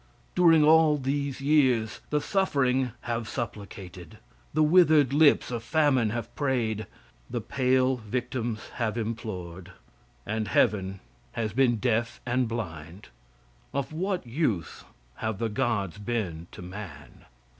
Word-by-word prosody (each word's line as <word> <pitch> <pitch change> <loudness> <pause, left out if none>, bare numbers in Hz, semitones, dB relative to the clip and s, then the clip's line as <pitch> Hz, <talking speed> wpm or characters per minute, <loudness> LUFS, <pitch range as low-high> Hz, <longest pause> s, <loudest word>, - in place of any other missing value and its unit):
During 165 -3 +5
all 155 0 +6
these 140 0 -2
years 130 -7 +2
the 150 - +1
suffering 135 -8 +1
have 115 -2 -3
supplicated; 95 0 -7 0.3
the 155 +1 +2
withered 155 -4 +5
lips 145 -3 +4
of 120 -2 -3
famine 130 -2 +2
have 120 +1 -4
prayed; 115 -7 -1 0.4
the - - -2
pale 130 -1 +1
victims 120 0 -4
have 115 -2 -1
implored, 95 -6 -5 0.5
and 110 0 -2
heaven 95 -2 +1 0.3
has 110 -2 -2
been 125 -1 +3
deaf 115 +1 0
and 125 0 +1
blind. 90 -5 -6 0.7
Of 140 +2 -2
what 185 0 -2
use 115 - -2 0.3
have 110 -2 -3
the 115 +2 -1
gods 105 -5 -1
been 100 -8 -3
to - - -10
man? 90 -8 -10
120 Hz, 125 wpm, -27 LUFS, 105-140 Hz, 0.7 s, all